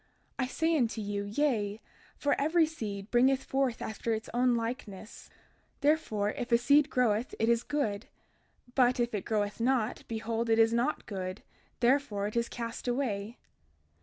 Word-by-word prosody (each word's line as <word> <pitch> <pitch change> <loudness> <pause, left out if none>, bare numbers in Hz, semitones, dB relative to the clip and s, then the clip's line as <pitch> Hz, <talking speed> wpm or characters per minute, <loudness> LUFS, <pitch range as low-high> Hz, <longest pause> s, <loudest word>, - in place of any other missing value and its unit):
I 255 - +1
say 325 +5 +1
unto 235 -6 +1
you, 205 -1 -3
Yea; 210 -3 0 0.4
for 285 - +1
every 320 +3 +4
seed 210 -10 -6
bringeth 260 +2 +4
forth 265 -3 -1
unto 220 +1 -4
its 220 -1 -2
own 245 0 +3
likeness. 230 -3 -5
32:32 - - -28 0.4
Therefore, 280 -9 +1
if 245 -2 -5
a 235 - +7
seed 285 +4 +4
groweth 240 -2 +1
it 225 - +1
is 235 0 +3
good, 225 -7 -2 0.7
but 250 -1 +3
if 240 -1 0
it 205 -3 -3
groweth 210 -2 -1
not, 240 -2 0
behold 230 +1 -2
it 225 - +4
is 225 0 +5
not 240 +6 0
good, 185 -2 -5 0.4
therefore 240 -5 +2
it 210 - -4
is 235 0 0
cast 230 +1 -6
away. 235 -3 -2
235 Hz, 165 wpm, -30 LUFS, 215-260 Hz, 0.7 s, a